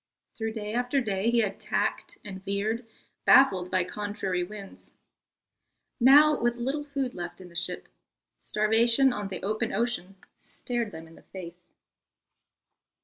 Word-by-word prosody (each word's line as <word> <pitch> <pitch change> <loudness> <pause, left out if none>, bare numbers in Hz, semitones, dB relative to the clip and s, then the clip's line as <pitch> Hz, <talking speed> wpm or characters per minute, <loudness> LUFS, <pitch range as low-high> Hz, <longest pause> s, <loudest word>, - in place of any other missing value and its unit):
Through 225 -1 -3
day 210 -1 -5
after 245 +3 +1
day 210 -3 0
he 235 0 +3
had 200 -3 -2
tacked - - -2
and 190 -2 -7
veered, 215 +4 -2 0.4
baffled 190 -10 +5
by 185 -1 +2
contrary 190 -1 -3
winds. 200 +1 -10 1.0
Now, 290 +4 +7
with 240 0 +2
little 270 +5 -2
food 275 -3 -3
left 175 0 -7
in 185 -1 -11
the 170 - -18
ship, 180 +1 -3 0.5
starvation 230 +5 +3
on 210 -3 -4
the 190 -2 -6
open 215 +3 -1
ocean 215 -3 -2 0.2
stared 240 -3 -4
them 160 -2 -9
in 165 - -16
the - - -16
face. 175 -2 -11
210 Hz, 145 wpm, -28 LUFS, 190-240 Hz, 1.0 s, Now